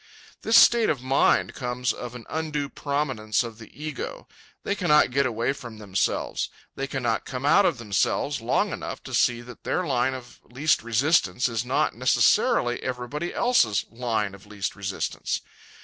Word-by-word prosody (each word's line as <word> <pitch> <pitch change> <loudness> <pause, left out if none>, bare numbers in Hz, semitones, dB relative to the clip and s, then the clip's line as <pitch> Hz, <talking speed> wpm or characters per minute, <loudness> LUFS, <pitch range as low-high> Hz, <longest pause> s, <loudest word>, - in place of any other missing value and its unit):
This 225 +1 +4
state 235 -1 +6
of 135 -5 -1
mind 135 +1 +2
comes 125 -1 -2
of 125 0 -7
an 120 - -9
undue 155 -3 -3
prominence 135 -8 -1
of 115 -1 -8
the 110 - -11
ego. 150 -1 -6 0.4
They - - 0
cannot 175 -9 +3
get 140 +1 +2
away 120 +2 -1
from 120 -5 -10
themselves. 100 -3 -1 0.2
They 135 - -4
cannot 120 -5 -1
come 130 +1 -5
out 185 +7 +5
of 165 - 0
themselves 120 +5 0
long 115 - +1
enough - - -6
to - - -9
see 120 -1 +2
that 120 +1 -12
their 180 - -1
line 130 -2 +1
of 120 -2 -11
least 140 +6 +1
resistance 115 - +2
is 115 -2 -2
not 125 +2 +1
necessarily 120 0 +2
everybody 130 +6 -4
else's 120 - +2
line 115 -4 -1
of 100 +1 -14
least 105 -2 -4
resistance. 100 -1 -3
125 Hz, 165 wpm, -25 LUFS, 115-145 Hz, 0.4 s, state